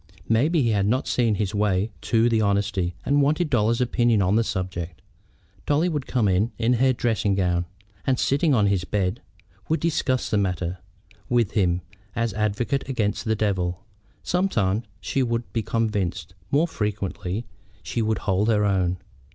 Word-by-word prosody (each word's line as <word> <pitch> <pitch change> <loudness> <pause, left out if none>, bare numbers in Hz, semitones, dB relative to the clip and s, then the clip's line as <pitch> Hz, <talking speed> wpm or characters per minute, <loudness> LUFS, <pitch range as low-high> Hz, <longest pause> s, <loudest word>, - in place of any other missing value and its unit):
Maybe 145 +8 +3
he 115 - +2
had 100 -2 +1
not 130 +5 +1
quite - - -12
seen 115 -4 +2
his 105 -1 -2
way 100 -3 +2 0.2
as - - -9
to 115 0 +4
the 115 -2 +2
honesty, 100 -3 0
and 145 +1 +3
wanted 155 +3 +1
Dolly's 115 0 +2
opinion 120 -2 +2
on 95 +1 +2
the 115 - +3
subject. 90 -4 -4 0.7
Dolly 155 +5 +2
would 150 -5 -3
come 120 -5 +1
in 100 +5 +2
in 120 +2 +2
her 130 0 +5
dressing 115 -5 0
gown, 90 -2 +1 0.4
and, 130 -1 +3
sitting 145 +5 +2
on 105 -3 +3
his 100 -3 +1
bed, 95 +2 -1 0.5
would 160 - +2
discuss 140 -6 0
the 105 - +3
matter 90 -2 -2 0.5
with 120 -4 +2
him 90 -4 +1 0.3
as 115 -3 0
advocate 110 +7 -1
against 110 -6 -1
the 110 -1 +1
devil. 95 -3 -1 0.4
Sometimes 115 - 0 0.2
she 135 - -1
would 120 -1 0
be 115 - 0
convinced; 100 -7 -2 0.2
more 150 +5 +3
frequently 105 - -3 0.4
she 120 - -2
would 110 0 +1
hold 100 +1 +2
her 105 -2 +3
own. 95 -2 +1
110 Hz, 170 wpm, -24 LUFS, 95-120 Hz, 0.7 s, her